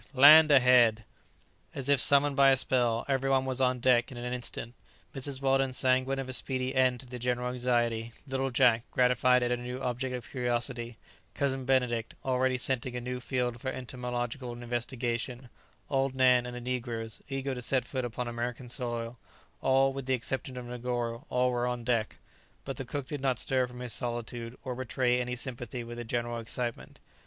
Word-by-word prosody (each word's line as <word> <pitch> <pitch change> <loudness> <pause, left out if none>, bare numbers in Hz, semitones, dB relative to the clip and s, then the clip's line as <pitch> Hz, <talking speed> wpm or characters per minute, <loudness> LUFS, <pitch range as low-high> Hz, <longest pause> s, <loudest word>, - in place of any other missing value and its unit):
Land 155 +4 +9
ahead!" 125 -5 +5 0.7
As 135 -1 -4
if 140 -1 +4
summoned 140 +2 +6
by 140 -1 +6
a 135 - +5
spell, 120 -3 +1
every 135 -1 0
one 135 -1 +2
was 130 0 -1
on 130 -1 +2
deck 120 0 +3
in 125 - -9
an 125 +1 -4
instant: 120 -1 -5 0.4
Mrs. 135 0 -4
Weldon, 135 -1 +2
sanguine 130 +1 +2
of 135 -1 -4
a 130 - -1
speedy 130 0 -1
end 130 -2 +2
to - - -12
the 125 0 -8
general 125 0 -1
anxiety; 120 -2 0
little 135 -1 -2
Jack, 125 -3 +4
gratified 125 0 +3
at 120 - 0
a 125 - +1
new 125 +1 -6
object 125 0 -2
of 120 -3 -7
curiosity; 120 -1 -1 0.4
Cousin 135 -2 -1
Benedict, 125 -3 0
already 130 0 +1
scenting 130 0 0
a - - -2
new 125 +1 -4
field 125 -2 -2
for 130 - -2
entomological 125 -1 -4
investigation; 120 +1 -3 0.4
old 135 -1 0
Nan; 125 -1 +4
and 125 - -7
the 125 - -6
negroes, 120 -3 -4
eager 135 0 -2
to 125 - -6
set 125 0 +1
foot 130 0 -3
upon 120 0 -4
American 120 +1 -4
soil; 120 -2 -4 0.4
all, 135 0 +3
with 135 -1 -6
the 130 - +2
exception 130 +2 -4
of 125 - -6
Negoro, 120 +2 -4
all 125 0 +2
were 120 0 0
on 125 -1 -3
deck; 115 -3 -1 0.5
but - - -5
the - - -5
cook 140 -2 -4
did 145 0 -6
not 130 -3 +1
stir 130 0 +1
from 125 0 -10
his 125 -3 -1
solitude, 120 0 -3
or 130 - -4
betray 125 0 0
any 125 0 -3
sympathy 120 -1 -5
with 120 0 -8
the - - -4
general 120 0 -2
excitement. 120 +1 -5
125 Hz, 185 wpm, -29 LUFS, 120-130 Hz, 0.7 s, Land